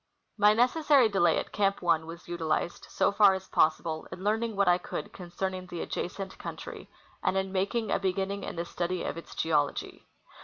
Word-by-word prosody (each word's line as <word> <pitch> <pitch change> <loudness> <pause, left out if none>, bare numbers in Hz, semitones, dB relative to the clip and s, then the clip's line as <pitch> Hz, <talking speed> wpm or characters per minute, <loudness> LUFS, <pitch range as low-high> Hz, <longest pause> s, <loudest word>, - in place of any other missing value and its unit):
My 210 0 +5
necessary 260 +1 +4
delay 175 -5 +3
at - - -3
Camp 200 -1 +1
1 165 -2 +1
was 170 +1 -10
utilized, 170 0 -2
so - - +2
far 200 -1 +6
as 190 0 -7
possible, 155 0 +1
in 185 - -8
learning 220 +2 0
what 200 -1 +2
I 175 0 +5
could - - -6
concerning 185 +1 -4
the 175 -2 -5
adjacent 190 +2 -5
country, - - -8 0.3
and 190 - +1
in 190 0 -1
making 200 +4 -1
a - - +2
beginning 195 +1 -1
in - - -5
the 170 0 -3
study 175 +1 -2
of - - -3
its 170 - -10
geology. 150 -3 -1
190 Hz, 185 wpm, -29 LUFS, 175-200 Hz, 0.3 s, far